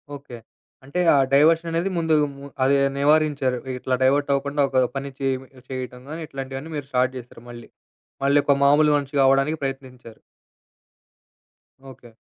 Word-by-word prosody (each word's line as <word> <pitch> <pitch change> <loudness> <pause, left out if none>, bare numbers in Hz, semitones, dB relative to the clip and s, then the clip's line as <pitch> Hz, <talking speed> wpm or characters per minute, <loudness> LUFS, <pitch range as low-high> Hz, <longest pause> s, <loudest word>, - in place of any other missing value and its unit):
Okay. 140 -3 -11 0.5
అంటే 140 +7 -4
ఆ - - +4 0.2
డైవర్షననేది 165 +4 +3
ముందు 160 -2 +2 0.2
ము 140 0 -11 0.2
అది 135 +2 +3 0.2
నివారించారు. 145 -3 +2 0.2
ఇట్లా 130 0 -1
డైవర్టవ్వకుండా 140 +1 +1
ఒక 130 -1 +2
పని 140 0 -4
చేయ్ 135 -1 0 0.3
చేయటం 130 -1 -6
గానీ, 160 +2 -6
ఇట్లాంటియన్నీ 135 +1 -7
మీరు 145 -2 -5
స్టార్ట్ 130 0 +1
జేశారు 120 -1 -12
మళ్ళీ. 120 -1 -11 0.5
మళ్ళీ 140 +1 +4
ఒక 140 - +4
మామూలు 150 +2 +5
మనిషిగా 140 -1 0
అవ్వడానికి 135 +4 +2
ప్రయత్నించారు. 130 -4 -7 1.7
ఓకే. 125 -2 -16
140 Hz, 130 wpm, -23 LUFS, 130-145 Hz, 1.7 s, మామూలు